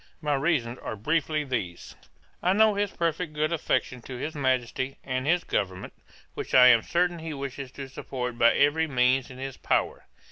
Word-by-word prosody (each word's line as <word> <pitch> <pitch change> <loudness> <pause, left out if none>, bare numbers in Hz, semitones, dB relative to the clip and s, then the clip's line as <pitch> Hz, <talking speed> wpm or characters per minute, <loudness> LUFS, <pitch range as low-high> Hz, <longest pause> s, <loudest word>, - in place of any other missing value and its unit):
My 150 -2 -1
reasons 135 -5 0
are - - -5
briefly 150 +6 0
these: 115 -11 -4 0.5
'I 180 - +3
know 215 +1 +5
his 205 0 0
perfect 165 -1 -2
good 155 +2 0
affection 130 -5 -1
to 130 - -8
his 155 +5 -4
Majesty, 130 -1 -1
and 130 0 -3
his 175 +2 +2
government, 95 -2 -3 0.4
which - - -4
I 125 -1 +9
am 120 -2 +6
certain 175 +5 0
he 160 -2 -5
wishes 135 -1 -6
to 135 -1 -7
support 125 -2 -5
by 115 - +6
every 155 +3 +3
means 130 -1 +2
in 130 - -11
his 135 0 -6
power. - - -1
135 Hz, 180 wpm, -27 LUFS, 125-160 Hz, 0.5 s, I